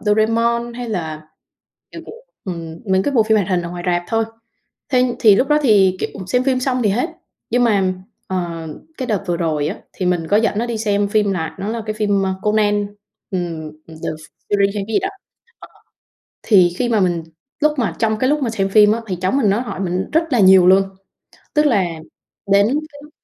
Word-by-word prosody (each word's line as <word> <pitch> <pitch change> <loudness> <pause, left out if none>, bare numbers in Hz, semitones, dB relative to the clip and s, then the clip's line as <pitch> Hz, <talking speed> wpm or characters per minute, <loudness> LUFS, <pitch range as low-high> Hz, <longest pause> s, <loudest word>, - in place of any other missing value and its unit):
Doraemon 230 +3 +1
hay 245 -1 -6
là, 160 -7 -4 0.7
kiểu, - - -9 0.4
ừm, 165 -4 -6
mấy 190 0 +2
cái 285 - -1
bộ 225 - +5
phim 220 0 +2
hoạt 200 -2 0
hình 180 -2 +1
ở 170 - -6
ngoài 175 0 -6
rạp 175 -1 +1
thôi. 225 0 +1 0.7
Thế 250 -1 +2
thì 210 -3 +6
lúc 270 - +1
đó 300 - +4
thì 195 -7 +4
kiểu - - -2 0.2
xem 250 +6 +1
phim 260 -1 +1
xong 255 -1 0
thì 210 - +2
hết. 250 - 0 0.4
Nhưng 245 +1 +3
mà, 195 -5 +2 0.3
ờ, 170 -3 -4 0.3
cái 255 - -3
đợt 210 -4 -1
vừa 175 -1 0
rồi 155 -4 -1
á - - -4 0.2
thì 185 - -3
mình 175 -2 0
có 205 - +3
dẫn 215 -1 +1
nó 235 - 0
đi 235 -2 -3
xem 205 -2 0
phim, 205 -1 +1
là 160 -4 -4
nó 195 +2 -4
là 230 +1 -3
cái 215 - -2
phim, 205 -2 +1
ơ, 190 - -1
Conan, 205 -1 +1 0.4
ừm, 170 -5 -4 0.2
The 165 - -11 0.6
Furry 200 -1 +3
hay 200 - +1
cái 200 -1 -2
gì - - +5
đó, 385 - 0 0.5
ờ, - - -12 0.8
thì 180 -5 +4
khi 245 - 0
mà 225 -3 +2
mình 175 -3 +1 0.4
lúc 305 0 +3
mà 240 - 0
trong 220 -2 0
cái 255 +3 +1
lúc 300 0 +1
mà 240 - 0
xem 195 -3 -1
phim 210 +1 +5
á, 230 - -1
thì 185 -4 -3
cháu 185 0 0
mình 265 -7 +2
nó 205 +4 +1
hỏi 240 - -5
mình 185 0 -2
rất 325 +1 +3
là 245 - +3
nhiều 190 -2 +7
luôn, 190 +1 +6 0.7
tức 300 0 +3
là 235 -9 +3 0.7
đến 200 +1 +5 0.2
cái 285 0 -13
mức 300 - -14
205 Hz, 220 wpm, -19 LUFS, 185-235 Hz, 0.8 s, nhiều